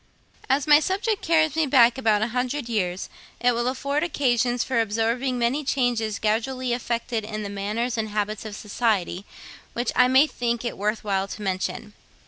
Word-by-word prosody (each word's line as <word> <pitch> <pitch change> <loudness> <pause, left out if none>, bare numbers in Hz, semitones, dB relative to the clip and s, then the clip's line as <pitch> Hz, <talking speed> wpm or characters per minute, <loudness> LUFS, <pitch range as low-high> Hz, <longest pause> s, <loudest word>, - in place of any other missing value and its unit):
As 270 +1 +2
my 295 -1 +7
subject 400 +6 -1
carries 315 -2 +2
me 320 -2 +2
back 245 -3 +5
about 220 -5 +2
a 225 - -1
hundred 250 +2 -2
years, 190 -5 -2 0.3
it 245 0 +3
will 240 +1 -1
afford 280 +3 -1
occasions 245 -6 +1
for 255 -3 +1
observing 230 +4 0
many 245 +5 0
changes 245 -6 0
gradually 240 +4 -1
effected 235 -1 -2
in 215 0 -5
the 200 - -5
manners 220 +4 -2
and 220 -1 -2
habits 210 0 -2
of 215 -2 -7
society, 205 -4 -1 0.5
which 240 0 -1
I - - +5
may 260 +3 +6
think 240 -4 -2
it 235 - -3
worth 210 +2 -2
while 195 -2 0
to 210 - -7
mention. 195 +2 -3
235 Hz, 175 wpm, -24 LUFS, 215-260 Hz, 0.5 s, my